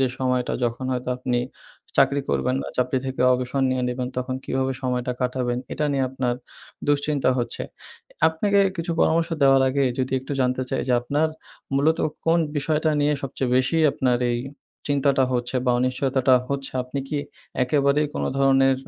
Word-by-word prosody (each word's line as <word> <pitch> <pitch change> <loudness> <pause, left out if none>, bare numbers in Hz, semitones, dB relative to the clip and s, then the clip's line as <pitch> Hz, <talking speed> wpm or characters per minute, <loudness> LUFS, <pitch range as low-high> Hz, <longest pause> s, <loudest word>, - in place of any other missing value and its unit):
যে 130 - +4
সময়টা 125 -1 0
যখন 120 +2 -2
হয়তো 125 0 -3
আপনি 125 -1 -1 0.6
চাকরি 140 0 +4
করবেন 130 0 +1
না - - -7
চাকরি 125 +1 +1
থেকে 130 -1 -4
অবসর 130 +2 -1
নিয়ে 130 -1 0
নিবেন, 125 0 -3
তখন 130 0 -2
কিভাবে 130 0 -1
সময়টা 125 -1 -1
কাটাবেন? 125 -1 -1
এটা 150 - -1
নিয়ে 135 -1 +1
আপনার 125 -2 -1 0.5
দুশ্চিন্তা 145 -2 +2
হচ্ছে। 120 -1 -2 0.7
আপনাকে 200 +5 +2 0.2
কিছু 170 +1 -3
পরামর্শ 165 +1 +3
দেওয়ার 135 -1 +6
আগে 140 +1 +1
যদি 130 0 -1
একটু 135 +2 -6
জানতে 130 0 +1
চাই - - 0
যে - - +3
আপনার 145 +6 0 0.5
মূলত 155 +4 +3 0.3
কোন 165 +1 +4 0.2
বিষয়টা 155 +2 +1
নিয়ে 145 +1 +3
সবচেয়ে 135 -1 -2
বেশি 130 +6 +2 0.2
আপনার 125 -2 +1
এই 120 - 0 0.5
চিন্তাটা 140 -1 +3
হচ্ছে 125 +1 -1
বা 125 - +4
অনিশ্চয়তাটা 130 +1 +2
হচ্ছে? 140 -1 -3
আপনি 130 +2 -5
কি 145 - -1 0.4
একেবারেই 140 +3 +2
কোনো - - -1
ধরনের 135 -1 +4
130 Hz, 160 wpm, -23 LUFS, 125-140 Hz, 0.7 s, দেওয়ার